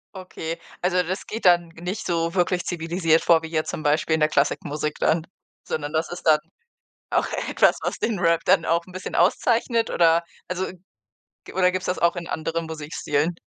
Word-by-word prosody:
Okay, 170 Hz, -3 st, -6 dB, 0.2 s
also, 180 Hz, 0 st, +2 dB
das 185 Hz, +3 st, -4 dB
geht 225 Hz, -1 st, -5 dB
dann 175 Hz, -1 st, +5 dB
nicht 180 Hz, +6 st, -5 dB
so 170 Hz, -1 st, 0 dB
wirklich 180 Hz, -1 st, +1 dB
zivilisiert 165 Hz, -1 st, +1 dB
vor 165 Hz, -1 st, +4 dB
wie -, -, -4 dB
jetzt 155 Hz, -1 st, -1 dB
zum 155 Hz, -, -5 dB
Beispiel 155 Hz, +1 st, +2 dB
in -, -, -1 dB
der 155 Hz, 0 st, +3 dB
Klassik-Musik 150 Hz, +1 st, 0 dB
dann, 160 Hz, 0 st, +2 dB, 0.4 s
sondern 145 Hz, -1 st, -3 dB
das 160 Hz, +1 st, 0 dB
ist 175 Hz, -, -7 dB
dann 155 Hz, -2 st, +6 dB, 0.7 s
auch -, -, +1 dB, 0.2 s
etwas, -, -, +4 dB
was -, -, -2 dB
den 215 Hz, -5 st, -1 dB
Rap 170 Hz, -1 st, +3 dB
dann -, -, +4 dB
auch 170 Hz, +1 st, +1 dB
'n 185 Hz, -, -15 dB
bisschen 185 Hz, 0 st, -6 dB
auszeichnet 230 Hz, +5 st, +2 dB
oder? 170 Hz, 0 st, +4 dB, 0.2 s
Also, 185 Hz, +1 st, -2 dB, 0.8 s
g -, -, -11 dB
oder 180 Hz, -1 st, +3 dB
gibt's 185 Hz, 0 st, -3 dB
das 180 Hz, -, -1 dB
auch 170 Hz, +1 st, +2 dB
in 170 Hz, -1 st, -5 dB
anderen 165 Hz, +1 st, -3 dB
Musikstilen? 155 Hz, 0 st, -2 dB
170 Hz, 185 wpm, -24 LUFS, 160-180 Hz, 0.8 s, dann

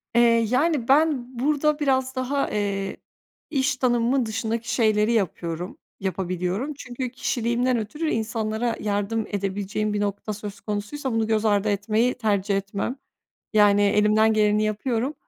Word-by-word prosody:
Eee, 235 Hz, -, +6 dB, 0.3 s
yani, 275 Hz, -1 st, +1 dB
ben 270 Hz, -4 st, +2 dB
burada 300 Hz, +2 st, +1 dB
biraz 260 Hz, -2 st, +1 dB
daha, 260 Hz, +2 st, -1 dB
eee, 200 Hz, -2 st, -2 dB, 0.5 s
iş 285 Hz, -1 st, +1 dB
tanımımın 245 Hz, 0 st, +2 dB
dışındaki 225 Hz, +1 st, -2 dB
şeyleri 215 Hz, -1 st, +3 dB
yapıyorum, 175 Hz, -4 st, -2 dB, 0.2 s
yapabiliyorum. 190 Hz, -, -2 dB
Çünkü 255 Hz, -2 st, -5 dB
kişiliğimden 245 Hz, 0 st, 0 dB
ötürü 295 Hz, +9 st, -3 dB
insanlara 225 Hz, 0 st, -1 dB
yardım 210 Hz, +2 st, -1 dB
edebileceğim 205 Hz, +1 st, -2 dB
bir 205 Hz, -, -1 dB
nokta 205 Hz, +1 st, -2 dB
söz 205 Hz, -1 st, -7 dB
konusuysa 215 Hz, +6 st, -3 dB
bunu 225 Hz, -1 st, +1 dB
göz 220 Hz, 0 st, +1 dB
ardı 205 Hz, 0 st, +2 dB
etmeyi 215 Hz, +4 st, +1 dB
tercih 205 Hz, -4 st, 0 dB
etmem. 200 Hz, +5 st, -3 dB, 0.6 s
Yani, 205 Hz, -1 st, +5 dB
elimden 210 Hz, +2 st, +4 dB
geleni 210 Hz, 0 st, +3 dB
yapıyorum 230 Hz, +5 st, -1 dB
220 Hz, 130 wpm, -24 LUFS, 205-255 Hz, 0.6 s, Eee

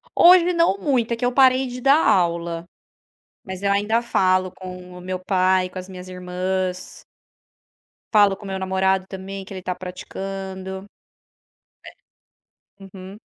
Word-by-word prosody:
Hoje 355 Hz, 0 st, +7 dB
não 335 Hz, -, +2 dB
muito, 235 Hz, +1 st, 0 dB
é -, -, 0 dB
que 230 Hz, -, -2 dB
eu 245 Hz, -, +2 dB
parei 260 Hz, 0 st, +4 dB
de 250 Hz, 0 st, -7 dB
dar 280 Hz, +5 st, +4 dB
aula. 170 Hz, -3 st, +1 dB, 0.8 s
Mas 190 Hz, 0 st, -7 dB
eu 200 Hz, -, +1 dB
ainda 210 Hz, +4 st, +1 dB
falo 185 Hz, -5 st, +1 dB
com 180 Hz, -1 st, -10 dB
o -, -, -11 dB
meu 185 Hz, +1 st, -4 dB
pai, 185 Hz, 0 st, +1 dB
com 185 Hz, -, -8 dB
as 185 Hz, 0 st, -8 dB
minhas 185 Hz, -1 st, -10 dB
irmãs 185 Hz, 0 st, -4 dB, 1.1 s
falo 205 Hz, -2 st, +5 dB
com 205 Hz, -, -13 dB
meu 190 Hz, -1 st, -4 dB
namorado 190 Hz, 0 st, 0 dB
também, 195 Hz, 0 st, -7 dB
que 195 Hz, -, -10 dB
ele 185 Hz, -, -7 dB
está 180 Hz, 0 st, -3 dB
praticando. 190 Hz, +1 st, -7 dB, 1.9 s
É. -, -, -13 dB
Uhum. 190 Hz, 0 st, -10 dB
190 Hz, 150 wpm, -22 LUFS, 185-205 Hz, 1.9 s, Hoje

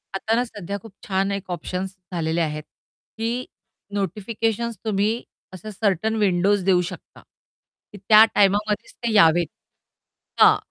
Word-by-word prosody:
आता 215 Hz, +3 st, -1 dB
ना 240 Hz, -, +2 dB
सध्या 200 Hz, -5 st, -6 dB
खूप 220 Hz, 0 st, -14 dB
छान 195 Hz, 0 st, 0 dB
एक 200 Hz, -1 st, -5 dB
ऑप्शन्स 185 Hz, +2 st, -4 dB, 0.2 s
झालेले 165 Hz, -1 st, -1 dB
आहेत 155 Hz, -1 st, -2 dB, 0.5 s
की 225 Hz, +1 st, -1 dB, 0.6 s
नोटिफिकेशन्स 215 Hz, +4 st, -2 dB
तुम्ही 215 Hz, +2 st, 0 dB, 0.3 s
असं 200 Hz, +4 st, -8 dB
सर्टन 210 Hz, +1 st, 0 dB
विंडोज 200 Hz, -1 st, +2 dB
देऊ 185 Hz, -2 st, +4 dB
शकता -, -, -12 dB, 0.7 s
की 205 Hz, -, -9 dB
त्या 215 Hz, +3 st, +7 dB
टाईमामध्येच 205 Hz, +1 st, +2 dB
ते 235 Hz, -, 0 dB
यावेत 170 Hz, -4 st, +5 dB, 0.9 s
हां, -, -, +8 dB
200 Hz, 130 wpm, -23 LUFS, 185-215 Hz, 0.9 s, हां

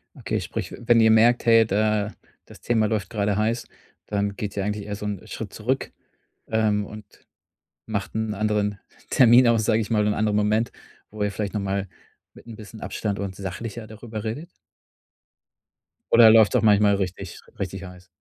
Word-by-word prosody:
Okay, -, -, -3 dB
sprich, -, -, -5 dB
wenn 120 Hz, 0 st, +3 dB
ihr 110 Hz, 0 st, +5 dB
merkt: 115 Hz, +2 st, +4 dB
„Hey, 115 Hz, -1 st, +6 dB
da 105 Hz, 0 st, 0 dB, 0.3 s
das -, -, -15 dB
Thema 110 Hz, -3 st, +1 dB
läuft 105 Hz, -4 st, -2 dB
grade 105 Hz, -2 st, -1 dB
heiß.“ 115 Hz, +2 st, -1 dB, 0.4 s
Dann 100 Hz, -1 st, -1 dB
geht 105 Hz, 0 st, -5 dB
ihr 100 Hz, -, -1 dB
eigentlich 105 Hz, 0 st, -3 dB
eher 105 Hz, -, -4 dB
so 105 Hz, -, -7 dB
'n 105 Hz, -1 st, -5 dB
Schritt 110 Hz, -2 st, -7 dB
zurück. 130 Hz, +5 st, -2 dB, 0.6 s
Ähm, 110 Hz, -2 st, +1 dB
und 105 Hz, +1 st, -10 dB, 0.8 s
macht 100 Hz, -3 st, -4 dB
'n 110 Hz, -1 st, -2 dB
anderen 105 Hz, -1 st, -1 dB, 0.3 s
Termin 125 Hz, 0 st, +6 dB
aus, 115 Hz, -2 st, +2 dB
sage 110 Hz, 0 st, +2 dB
ich 110 Hz, -, -4 dB
mal, 105 Hz, -2 st, +2 dB
'n 105 Hz, -, +1 dB
anderen 105 Hz, -1 st, 0 dB
Moment, 105 Hz, +2 st, +1 dB, 0.4 s
wo 105 Hz, 0 st, -5 dB
ihr 105 Hz, -, +1 dB
vielleicht 100 Hz, 0 st, -4 dB
noch 105 Hz, -, -1 dB
mal 100 Hz, 0 st, -2 dB, 0.5 s
mit -, -, -16 dB
'n 115 Hz, -2 st, -9 dB
bisschen 110 Hz, 0 st, -11 dB
Abstand 105 Hz, -2 st, -3 dB
und 100 Hz, -2 st, -5 dB
sachlicher 105 Hz, +4 st, -6 dB
darüber 110 Hz, 0 st, -8 dB
redet? 145 Hz, +11 st, -5 dB, 1.6 s
Oder 115 Hz, -1 st, +8 dB
läuft's 110 Hz, -2 st, +5 dB
auch -, -, +4 dB
manchmal 105 Hz, -1 st, +5 dB
richtig 95 Hz, -1 st, -5 dB, 0.2 s
richtig 95 Hz, 0 st, -4 dB
heiß? 90 Hz, -1 st, -13 dB
105 Hz, 180 wpm, -24 LUFS, 100-110 Hz, 1.6 s, Oder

